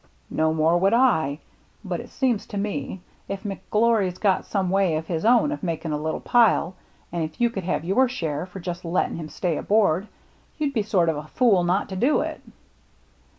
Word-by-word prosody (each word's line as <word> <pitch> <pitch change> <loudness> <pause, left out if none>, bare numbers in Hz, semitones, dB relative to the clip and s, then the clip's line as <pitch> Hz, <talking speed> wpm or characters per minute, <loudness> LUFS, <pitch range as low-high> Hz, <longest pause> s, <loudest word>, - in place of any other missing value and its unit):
" - - -37
No 160 0 +3
more 160 +2 +2
would 195 +5 +3
I. 160 - +3 0.5
But - - -3
it - - -9
seems 250 -6 0
to 205 - -6
me, 195 -3 -3 0.3
if 195 +1 -5
McGlory's 210 -1 0
got 195 -3 +1
some 190 -3 -1
way 190 -4 +2
of 160 +1 -3
his 165 -1 -3
own 245 +6 +4
of 300 - -4
making 165 -3 -3
a 150 0 -2
little 160 +1 -2
pile, 225 -7 +3 0.4
and 170 -1 -2
if 155 0 -6
you 240 -1 +3
could 195 -5 -5
have 165 -3 -1
your 245 +8 +3
share 165 - -3
for 190 +1 -9
just 175 0 -5
letting 170 0 -1
him 155 -2 -6
stay 170 -2 -2
aboard, 200 -3 +2 0.5
you'd 295 -3 -1
be 225 - +1
sort 195 -5 +1
of 160 -2 +1
a 150 +1 -7
fool 200 -1 +3
not 180 +3 +1
to 190 - -5
do 255 +11 +2
it." - - -5
190 Hz, 205 wpm, -24 LUFS, 165-220 Hz, 0.5 s, own